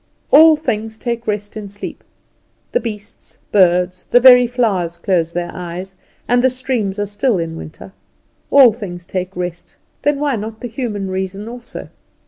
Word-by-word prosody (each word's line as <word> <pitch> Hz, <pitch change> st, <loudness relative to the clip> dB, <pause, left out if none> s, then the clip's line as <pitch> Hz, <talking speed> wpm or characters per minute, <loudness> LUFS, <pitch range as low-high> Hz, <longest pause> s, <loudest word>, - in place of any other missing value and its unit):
All 315 Hz, +2 st, +8 dB
things 225 Hz, -6 st, -3 dB
take 235 Hz, 0 st, -4 dB
rest 205 Hz, 0 st, -3 dB
in 210 Hz, -2 st, -6 dB
sleep; 205 Hz, +1 st, -8 dB, 0.7 s
the -, -, +2 dB
beasts, 210 Hz, -3 st, -8 dB
birds, 180 Hz, -2 st, +2 dB
the 245 Hz, -, +6 dB
very 250 Hz, -1 st, +8 dB
flowers 200 Hz, -9 st, -1 dB
close 170 Hz, -2 st, 0 dB
their 175 Hz, 0 st, -3 dB
eyes, 180 Hz, +2 st, -7 dB, 0.3 s
and 245 Hz, +1 st, +3 dB
the 260 Hz, -, +5 dB
streams 250 Hz, -6 st, -2 dB
are 205 Hz, -, -1 dB
still 205 Hz, +3 st, 0 dB
in 165 Hz, -1 st, -3 dB
winter; 160 Hz, +4 st, -10 dB, 0.6 s
all 265 Hz, -5 st, +7 dB
things 180 Hz, -6 st, -8 dB
take 185 Hz, +1 st, -4 dB
rest; 175 Hz, -1 st, -5 dB, 0.3 s
then 290 Hz, -1 st, +1 dB
why 285 Hz, -4 st, 0 dB
not 220 Hz, +1 st, -7 dB
the 245 Hz, -, -4 dB
human 215 Hz, -5 st, -4 dB
reason 190 Hz, +2 st, -4 dB
also? 240 Hz, +1 st, -9 dB
205 Hz, 160 wpm, -18 LUFS, 185-245 Hz, 0.7 s, All